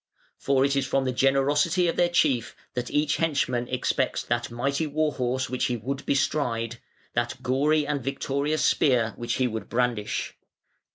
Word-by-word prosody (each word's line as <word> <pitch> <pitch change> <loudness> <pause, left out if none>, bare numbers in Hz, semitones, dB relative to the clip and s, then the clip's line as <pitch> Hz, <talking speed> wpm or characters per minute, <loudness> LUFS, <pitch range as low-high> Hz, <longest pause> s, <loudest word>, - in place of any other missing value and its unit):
For 135 -1 +2
it 140 0 +1
is 135 -1 0
from 135 0 +1
the 130 - +1
generosity 145 +7 +2
of 165 - 0
their 175 - +3
chief 145 -9 +1 0.2
that 125 -2 -3
each 150 0 +1
henchman 140 -6 0
expects 125 - 0
that - - -1
mighty 140 +6 -1
war 155 +1 0
horse 125 0 -1
which 130 +1 -1
he 125 - -1
would 135 +5 -5
bestride, 120 -5 0 0.3
that - - -1
gory 145 +4 +2
and 145 -3 -2
victorious 140 +3 -1
spear, 120 -6 +3
which 120 - -3
he 130 - +1
would 110 -3 -5
brandish. 120 -3 -1
135 Hz, 165 wpm, -26 LUFS, 125-145 Hz, 0.3 s, their